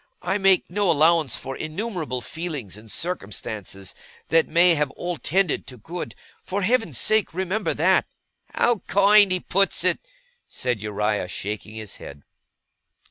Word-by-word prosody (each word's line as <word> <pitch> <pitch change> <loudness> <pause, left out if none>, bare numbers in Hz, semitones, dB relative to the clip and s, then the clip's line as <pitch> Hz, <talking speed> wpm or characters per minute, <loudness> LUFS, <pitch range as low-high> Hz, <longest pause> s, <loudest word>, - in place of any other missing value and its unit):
I 195 +2 0
make 195 -1 +4
no 200 +1 0
allowance 160 -3 +4
for 135 0 -6
innumerable 155 - -3
feelings 150 - -5
and 105 0 -11
circumstances 105 - -4 0.4
that 165 0 +4
may 170 +2 +5
have 150 -3 +1
all 175 -1 -3
tended 185 0 0
to 125 - -9
good. 170 +11 -6 0.3
For 200 +1 -2
Heaven's 225 - +1
sake 215 - +1
remember 190 +3 -1
that!' - - +3 0.5
'How 240 -3 +3
kind 200 0 +6
he 185 - +1
puts 195 +1 +1
it!' - - +2 0.5
said 125 -5 -2
Uriah, 105 -2 -1
shaking 105 +3 -5
his 110 -2 -6
head. 70 0 -11
165 Hz, 140 wpm, -24 LUFS, -, 0.5 s, kind